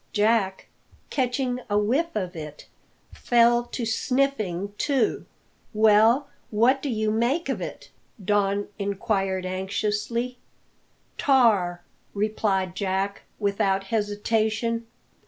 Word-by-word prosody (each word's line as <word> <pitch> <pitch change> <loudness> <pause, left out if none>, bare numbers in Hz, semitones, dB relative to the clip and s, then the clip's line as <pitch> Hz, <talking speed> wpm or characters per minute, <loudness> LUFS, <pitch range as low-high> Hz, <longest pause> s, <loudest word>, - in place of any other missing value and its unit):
Jack, 210 -2 +1 0.5
catching 250 -1 0
a 205 - +2
whiff 265 +11 +1
of 185 -4 -3
it, 150 -2 -8 0.5
fell 240 0 +3
to 240 0 -4
sniffing 220 -6 -1
too. 275 -3 0 0.5
"Well, 220 +5 +5 0.2
what 240 +5 +3
do 285 - -3
you 220 -3 0
make 245 +10 0
of - - -2
it?" - - -7 0.3
Don 205 0 +1
inquired 195 -2 -1
anxiously. 210 +6 -2 0.8
"Tar!" 205 -11 +3 0.3
replied 200 -3 0
Jack, 195 +1 -1 0.2
without 200 -2 +1
hesitation. 220 +2 0
215 Hz, 100 wpm, -25 LUFS, 195-240 Hz, 0.8 s, Well